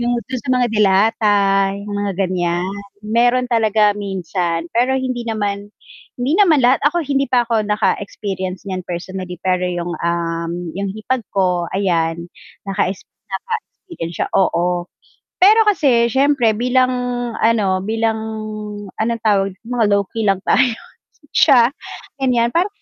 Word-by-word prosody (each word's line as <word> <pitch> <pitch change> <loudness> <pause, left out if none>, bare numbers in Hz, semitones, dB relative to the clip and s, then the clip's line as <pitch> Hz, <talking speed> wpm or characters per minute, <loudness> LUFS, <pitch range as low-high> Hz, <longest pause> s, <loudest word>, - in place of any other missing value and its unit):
yung 240 0 0
do'n 260 -2 -5
sa 265 - -4
mga 250 -1 +2
delata, 210 +1 +3 0.5
yung 205 0 -6
mga 205 -1 -1
ganiyan. 180 -1 -1 0.3
Meron 240 +3 +2
talaga 220 -3 +3
minsan, 180 -4 -3
pero 255 +3 +2
hindi 255 -2 -2
naman 205 -2 -2 0.5
hindi 250 +4 0
naman 330 -9 +5
lahat, 250 +2 +4
ako 345 +2 -1
hindi 275 -1 0
pa 250 -2 +4
ako 225 -2 0
naka-experience 195 -3 -2
niyan 185 -1 -4
personally, 180 +1 -5
pero 180 -1 +1
'yung, 175 -1 -3
um, 170 0 -2 0.3
'yung 200 - -1
hipag 235 +3 -2
ko, 180 -3 +1
ayan, 170 -3 0 0.4
naka-exp 195 -1 -1 0.3
naka-experience 380 - -6
siya - - -1
oo. 175 -1 +1 0.5
Pero 425 +4 +7
kasi 255 - +3
siyempre 270 -4 +3
bilang 250 +2 +2 0.5
ano, 205 -5 +2
bilang 225 +1 0 0.8
anong 230 +1 0
tawag 195 -2 +2
mga 240 -1 0
low 200 0 +3
key 225 -2 -1
lang 195 -1 +2
tayo 250 -1 +3 0.6
siya, 250 -5 +5 0.5
ganiyan 240 -3 +2
parang 350 +4 +2
215 Hz, 135 wpm, -18 LUFS, 185-245 Hz, 0.8 s, Pero